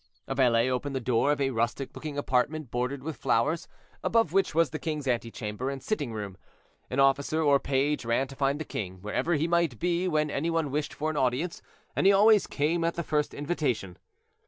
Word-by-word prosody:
A - - -2
valet 125 -3 +3
opened 130 +2 -2
the - - 0
door 125 +3 +2
of 145 - 0
a 135 -1 +1
rustic 120 +3 -1
looking 150 -2 -6
apartment 145 +1 0
bordered 125 +2 -2
with 160 0 -5
flowers, 140 +6 +1 0.4
above 225 -8 +2
which 195 -5 +2
was 165 -1 +3
the 155 - -4
king's 150 -2 -3
antechamber 115 0 -2
and 135 -1 -5
sitting 145 - -2
room. 100 -4 -6 0.5
An 130 - -2
officer 135 +3 +3
or 140 -2 +5
page 140 +2 0
ran 115 +3 +1
to 135 - -10
find 140 +1 0
the 155 - -4
king, 95 -7 -5
wherever 160 +11 0
he 155 +2 +1
might 170 -7 +1
be 175 +4 0
when 155 -3 +1
any 160 +5 -1
one 165 -4 0
wished 150 +1 -1
for 155 +1 -1
an 155 - -5
audience, 135 +7 0 0.3
and - - +3
he - - +8
always 210 +1 +5
came 160 +4 0
at 170 0 0
the 170 - -2
first 150 -1 -1
invitation. 140 - -2
140 Hz, 205 wpm, -28 LUFS, 125-160 Hz, 0.5 s, he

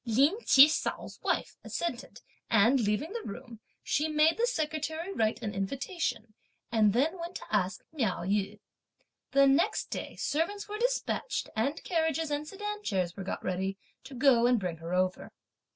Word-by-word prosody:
Lin 275 - +3
Chih 275 +2 +9
hsiao's 310 - -3
wife - - -1
assented; 260 -8 -4 0.3
and 230 +4 +5
leaving 220 - -1
the 470 - -3
room, 230 +2 -8 0.2
she 300 +2 +1
made 310 +1 +3
the 475 +1 +1
secretary 315 - -2
write 220 - 0
an 205 -2 -3
invitation 230 - -3 0.4
and 215 -3 +4
then 300 - +1
went 340 +2 -6
to - - -6
ask 190 -1 0
Miao 225 - -1
Yü. 195 +1 -1 0.7
The 275 0 +5
next 330 +10 +2
day - - -5
servants 335 +8 -1
were 420 +1 -5
despatched, - - -1
and 275 +8 -1
carriages 320 -3 0
and 295 +1 -2
sedan 415 +4 -5
chairs 185 - -1
were 195 - -6
got 190 - -5
ready 190 +1 -2 0.3
to 265 0 -9
go 245 -2 +5
and 245 -2 +3
bring 180 -4 -3
her 165 +2 -7
over. 185 0 -1
275 Hz, 165 wpm, -30 LUFS, 210-325 Hz, 0.7 s, Chih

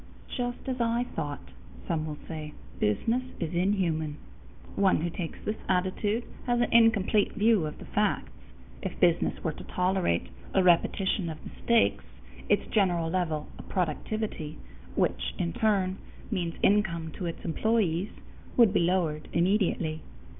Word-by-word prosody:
"Just 245 -1 -2
as 255 -2 -1
I 235 +1 +2
thought," 145 - -5 0.4
some 155 -1 -1
will 150 -1 -5
say, 155 -2 -6 0.3
"business 225 - +1 0.2
is 165 -1 -2
inhuman." 170 -5 +1 0.6
One 190 -5 +3
who 170 +1 -1
takes 170 -1 -5
this 215 +1 -1
attitude 190 +5 +1 0.2
has 240 0 +2
an 240 - +1
incomplete 220 -3 +4
view 215 -6 +3
of 150 - -7
the - - -10
facts. 65 - 0 0.5
If - - -5
business 170 -1 +2
were 160 - 0
to - - -10
tolerate 180 - 0 0.3
a 190 - +5
repetition 180 +1 +3
of 155 - -5
mistakes, 235 -1 +2 0.5
its - - +3
general 175 -6 +2
level 160 -5 -1
of - - -11
productivity 180 -1 -2 0.4
which, - - 0
in 85 - -1
turn, 195 -3 +1 0.3
means 175 -5 -1
income 170 -6 +2
to 180 - -2
its 165 - -6
employees 195 0 +1 0.5
would 230 -5 +6
be - - +4
lowered 170 -4 +1
immediately. 170 -4 +1
180 Hz, 140 wpm, -29 LUFS, 160-210 Hz, 0.6 s, would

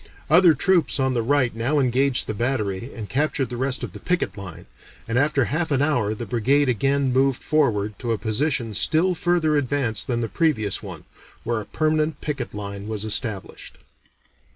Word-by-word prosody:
Other 170 -1 +6
troops 175 -2 +2
on 130 -1 +1
the 120 - 0
right 125 -1 +1
now 120 +7 0
engaged 130 0 +2
the 110 - -3
battery 115 -1 -2
and 110 -3 -7
captured 135 -1 -1
the - - -4
rest 130 +2 -1
of - - -5
the - - -8
picket 180 0 -1
line, 90 -4 -9 0.4
and 115 - -2
after 140 0 +2
half 160 +6 -1
an 140 -1 +2
hour 120 -8 0
the 120 - -6
brigade 130 +7 +2
again 135 +2 +1
moved 135 0 +1
forward 105 -9 0
to 120 -2 -3
a 115 - +1
position 115 +1 -1
still 170 - +2
further 170 -3 +1
advanced 130 -5 -1
than 120 -2 -1
the 115 - -1
previous 110 - 0
one, - - -9 0.4
where 115 -2 -1
a - - -9
permanent 155 -1 0
picket 135 -8 -4
line 100 0 -6
was 110 -1 -4
established." 110 -2 -2
130 Hz, 180 wpm, -23 LUFS, 110-145 Hz, 0.4 s, Other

